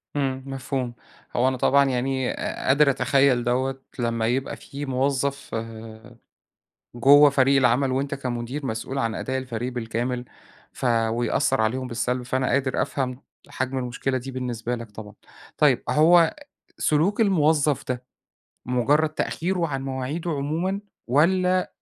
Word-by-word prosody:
إمم، 135 -2 -1
مفهوم. 135 -2 -3 0.4
هو 125 +2 +3
أنا 130 -1 0
طبعًا 140 +3 +4
يعني 130 0 -1
أ - - -4
قادر 140 +2 +5
أتخيّل 135 -2 +3
دوّة، 130 +2 -1 0.2
لمّا 115 -2 0
يبقى 130 +3 -1
في 145 0 -7
موظّف 140 +1 -1 1.4
جوّه 145 +4 +7
فريق 135 0 +3
العمل 130 +1 +3
وأنت 135 +2 -1
كمدير 125 +1 -4
مسؤول 115 +3 -4
عن 115 -4 -1
أداء 130 0 -2
الفريق 125 -1 -4
بالكامل، 120 +1 -3 0.5
ف - - -6 0.2
ويأثّر 115 -1 +1
عليهم 130 +4 -1
بالسلب. 125 +1 -2
فأنا 130 +1 -1
قادر 135 0 +1
أفهم 130 -1 -3 0.3
حجم 130 +1 -3
المشكلة 130 +1 -2
دي 130 +2 -7
بالنسبة 125 -2 -3
لك 115 -2 -9
طبعًا. 105 0 -10 0.4
طيب، - - +3
هو 165 +2 +5 0.4
سلوك 170 +9 +2
الموظّف 155 - +2
ده، 125 -1 -2 0.6
مُجرّد 140 +6 +2
تأخيره 170 +3 -1
عن 135 -2 -3
مواعيده 135 +6 -3
عمومًا، 160 +7 -1 0.3
والّا 180 +7 +3
أ - - -7
130 Hz, 135 wpm, -24 LUFS, 125-145 Hz, 1.4 s, جوّه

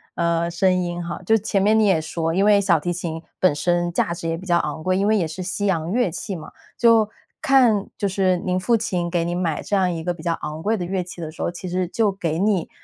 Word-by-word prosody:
呃， 170 0 0
声 185 +2 +2
音 175 -1 -2
哈。 170 +1 -5
就 220 - +4
前 200 -1 0
面 215 +2 +4
你 220 - +4
也 190 -5 +3
说， 165 +1 -2
因 195 +3 +2
为 205 -1 +5
小 170 - +3
提 175 +3 -2
琴 165 -2 -4 0.2
本 185 -5 +4
身 175 +4 0
价 170 - 0
值 165 -1 -4
也 165 - -1
比 185 - -10
较 175 -2 +3
昂 150 +1 -3
贵， 185 +2 +1
因 195 - +1
为 215 +1 +3
也 170 -5 0
是 180 +4 -6
西 200 +3 -3
洋 170 -3 0
乐 240 -2 +2
器 190 +4 -5
嘛。 155 -3 -7 0.3
就 225 -3 +4 0.3
看， 255 -9 +4
就 200 - 0
是 185 -1 +1
您 180 +1 -1
父 230 +5 +2
亲 180 -5 -2
给 170 -1 0
您 175 +1 -2
买 165 -4 -1
这 205 - -2
样 185 -2 +2
一 165 -1 -4
个 175 +2 -1
比 165 -2 -12
较 170 - 0
昂 155 +1 -5
贵 220 +3 +1
的 180 - -3
乐 185 0 -2
器 180 0 -11
的 160 -2 -5
时 155 - -10
候， - - -1
其 175 +1 -8
实 180 +1 -1
就 220 -1 +1
给 170 -4 -2
你， 195 -4 +1
180 Hz, 290 characters per minute, -22 LUFS, 170-200 Hz, 0.3 s, 为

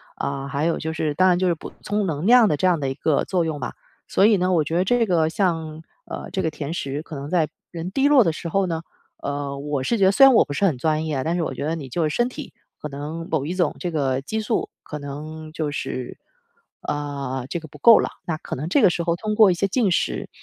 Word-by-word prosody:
啊， 140 -1 -3
还 140 +2 -1
有 170 - +1
就 160 - -3
是 155 -1 -1
当 185 +5 +4
然 175 -1 +3
就 185 - +2
是 175 - +2
补 - - -9
充 210 0 -1
能 160 -2 -2
量 240 -2 +7
的 150 - +1
这 185 - +2
样 180 -2 +3
的 135 - -1
一 - - -2
个 145 +2 +1
作 180 -3 0
用 150 -4 -3
吧。 125 - -4 0.4
所 195 - +4
以 215 0 +6
呢， 185 -1 +1
我 165 -4 +2
觉 160 - -3
得 180 - +3
这 235 +4 +2
个 165 -5 +2
像， 165 -4 -1 0.2
呃， - - -7
这 190 - -1
个 160 - 0
甜 155 0 -5
食 140 -3 -3
可 155 - -9
能 140 +1 -6
在 165 -3 +2 0.2
人 170 +1 -5
低 270 +8 +2
落 280 -4 +7
的 165 - +1
时 165 +2 -6
候 195 +2 +1
呢， 165 -2 -2 0.4
呃， 140 -1 -3
我 145 -1 -2
是 235 - 0
觉 200 - +2
得， 190 - +6
虽 270 +7 +7
然 270 -2 +7
我 - - +7
不 - - -9
是 195 - +1
很 160 -9 +1
专 155 +3 0
业 155 -2 -2
啊， 130 - -1
但 165 +4 0
是 - - 0
我 155 - -2
觉 140 - -4
得 160 - -1
你， 145 -5 -7
就 165 +7 -1
是， 150 - -3
身 240 - +2
体 270 +2 -8 0.3
可 150 - -5
能 150 +4 -6
某 150 -4 0
一 175 +4 -3
种 185 - +1
这 180 - -2
个 135 -4 0
激 220 +10 -3
素， 215 +1 -1
可 150 - -7
能， 155 +2 -7
就 155 -2 -2
是， 130 -3 -5 0.6
呃， 140 -3 -4
这 170 - -2
个 160 - -10
不 - - -14
够 230 -2 +8
了。 - - +1 0.2
那 165 - 0
可 - - -6
能 145 +5 -4
这 270 +11 +3
个 205 - +7
时 170 - -2
候 170 0 +1
通 215 +4 -3
过 215 -3 +7
一 - - +3
些 195 +3 0
进 220 0 +2
食， 175 - -1
160 Hz, 300 characters per minute, -23 LUFS, 145-185 Hz, 0.6 s, 够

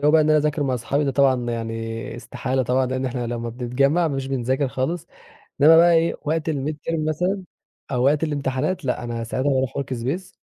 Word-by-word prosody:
جو 145 +1 +4
بقى 160 +1 +6
إن 155 - +2
أنا 155 - +5
أذاكر 150 0 0
مع 130 -2 0
صحابي 140 +5 -1
ده 140 - +1
طبعًا 130 -3 +2
يعني 115 0 -4
استحالة 130 +2 -2
طبعًا 130 +2 +1
لأن 130 +1 -2
إحنا 120 -1 -3
لمّا 120 0 -3
بنتجمع 135 +8 +1
مش 135 -2 -3
بنذاكر 130 +1 0
خالص، 150 +7 -2 0.6
إنما 160 +3 +8
بقى 170 +1 +6
إيه 165 0 +2
وقت 160 +1 -1
الmidterm 155 +2 -2
مثلًا 180 +5 -1 0.5
أو 125 -1 +1
وقت 145 +3 +3
الامتحانات، 150 +3 -1
لأ 125 -1 -1
أنا 115 -1 -4
ساعتها 130 +5 -1
باروح 130 -1 0
workspace 140 +7 -3
135 Hz, 190 wpm, -23 LUFS, 125-155 Hz, 0.6 s, إنما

